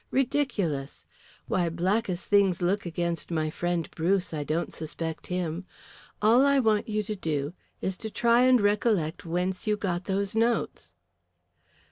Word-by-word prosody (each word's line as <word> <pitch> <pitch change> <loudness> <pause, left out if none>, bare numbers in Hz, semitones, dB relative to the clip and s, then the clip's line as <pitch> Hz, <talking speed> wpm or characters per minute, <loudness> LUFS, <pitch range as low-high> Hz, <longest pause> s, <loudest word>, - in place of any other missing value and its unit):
Ridiculous! 230 - -1 0.4
Why, 175 -2 +1
black 190 +7 0
as 175 0 -3
things 200 -4 +3
look 185 +2 0
against 170 0 -2
my 155 -2 -1
friend 175 0 -1
Bruce, 180 +2 0
I 150 -2 -2
don't 155 +4 -2
suspect 160 0 -5
him. 180 0 -3 0.6
All 235 +5 +6
I 280 0 +4
want 220 -3 +2
you 215 0 0
to 210 +1 -4
do 150 -5 -2 0.3
is 190 -1 -2
to 220 - -5
try 235 +2 +3
and 255 -1 +6
recollect 205 -6 +1
whence 180 +4 -2
you 210 0 +2
got 180 -3 -2
those 195 +1 -1
notes." 225 - 0
185 Hz, 150 wpm, -27 LUFS, 165-215 Hz, 0.6 s, All